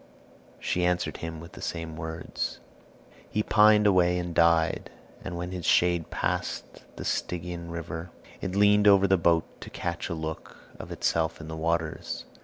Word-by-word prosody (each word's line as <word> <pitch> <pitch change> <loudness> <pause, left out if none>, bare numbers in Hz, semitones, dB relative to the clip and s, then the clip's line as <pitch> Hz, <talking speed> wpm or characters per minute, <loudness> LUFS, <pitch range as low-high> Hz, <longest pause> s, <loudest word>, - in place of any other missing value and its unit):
she 90 - -1
answered 90 -3 0
him 80 -1 -6
with 85 +1 -11
the - - -11
same 80 -2 -4
words. 80 0 -4 0.7
He 105 - 0
pined 105 0 +5
away 90 -3 +4
and 90 -1 -3
died; 85 -1 +3 0.3
and 90 -2 -5
when 90 +1 -4
his 90 -2 -5
shade 85 -1 +3
passed - - -3
the - - -7
Stygian 85 -1 -3
river, 85 0 -5 0.3
it 95 - -3
leaned 105 +1 +5
over 100 -1 +7
the 95 0 +4
boat 85 -1 +3 0.2
to - - -8
catch 85 -1 -4
a 85 - -2
look 80 0 -6 0.2
of - - -8
itself 80 0 0
in 80 0 -8
the 80 - -5
waters. 80 0 -2
85 Hz, 165 wpm, -27 LUFS, 80-90 Hz, 0.7 s, over